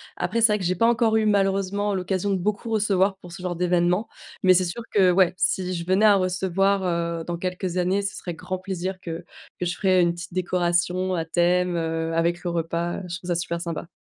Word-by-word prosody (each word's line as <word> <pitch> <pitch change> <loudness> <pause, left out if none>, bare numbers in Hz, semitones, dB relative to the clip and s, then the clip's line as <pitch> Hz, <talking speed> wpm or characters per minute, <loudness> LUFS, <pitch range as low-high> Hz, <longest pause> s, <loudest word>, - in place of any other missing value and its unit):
Après, 230 +6 -1
c'est 220 -2 +6
vrai 210 - 0
que - - -5
j'ai 185 - +1
pas 230 - +2
encore 230 -2 +3
eu, 220 - +1
malheureusement, 200 0 +1
l'occasion 185 +1 -1
de - - +2
beaucoup 205 +4 -2
recevoir 200 -3 +2
pour 175 -2 -13
ce 180 - -9
genre 180 -1 -3
d'événement. 180 +3 +1 0.4
Mais 185 0 +7
c'est 185 0 +3
sûr 180 +7 -5
que 190 -3 +5
ouais, 180 -1 +3
si 185 -1 0
je 170 -1 -4
venais 190 +4 +3
à 205 -2 +7
recevoir, 190 +1 +1
heu, 170 -2 -1
dans 175 -1 -3
quelques 180 0 -3
années, 185 +3 +1
ce 195 - -3
serait 175 - -6
grand 185 +3 -5
plaisir 185 0 -4
que 170 -1 -7 0.3
que 180 - -1
je 175 - -2
ferais 185 -2 +3
une 170 -1 +2
petite 170 +1 -9
décoration 180 +1 0
à 165 - -2
thème, 175 +2 +1
heu, 165 0 -2
avec 170 +2 0
le 175 - -2
repas, 170 +1 -2
heu. - - -6
Je 175 - -4
trouve 180 0 -10
ça 175 - +1
super 170 0 -2
sympa. 170 -1 -5
180 Hz, 230 wpm, -24 LUFS, 175-195 Hz, 0.4 s, Mais